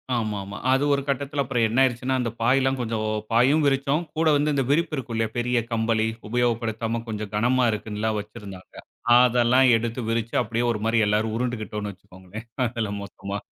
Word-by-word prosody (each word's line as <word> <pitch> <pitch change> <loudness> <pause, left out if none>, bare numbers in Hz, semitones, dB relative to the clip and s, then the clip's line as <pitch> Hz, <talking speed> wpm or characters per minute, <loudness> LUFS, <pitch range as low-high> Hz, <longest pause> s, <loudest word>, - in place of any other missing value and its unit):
ஆமா, 110 -3 -1
ஆமா. 100 +1 -8
அது 135 +2 +3
ஒரு 140 - +1
கட்டத்தில 140 +1 -1
அப்பறம் 120 -3 +1
என்ன 115 +4 0
ஆயிருச்சுன்னா, 130 +1 0
அந்த 115 -2 -2
பாய்லாம் 135 +2 +2
கொஞ்சம் 110 -2 -2 0.3
பாயும் 135 +7 +4
விரிச்சோம். 140 +3 +1
கூட 160 0 +2
வந்து 150 +1 +1
இந்த 135 - +1
விரிப்பு 155 +1 +1
இருக்கும் 120 -3 -5
இல்லயா! 110 -1 -1
பெரிய 120 0 +1
கம்பளி 110 -1 +1 0.2
உபயோகப்படுத்தாம 115 -1 -1
கொஞ்சம் 105 -2 -5
கனமா 125 +4 +2
இருக்குன்ல்லாம் 105 +1 -2
வச்சிருந்தாங்க. 105 -3 -10 0.4
அதெல்லாம் 125 +1 +4
எடுத்து 115 +2 -3
விரிச்சு, 115 0 -2
அப்பிடியே 115 +2 -1
ஒருமாரி 115 +1 0
எல்லாரும் 110 +1 +1
உருண்டுகிட்டோன்னு 110 -4 -3
வச்சுக்கோங்களேன் 95 +3 -12 0.2
அதுல 115 -3 -3
மொத்தமா. 100 0 -6
115 Hz, 160 wpm, -24 LUFS, 110-130 Hz, 0.4 s, பாயும்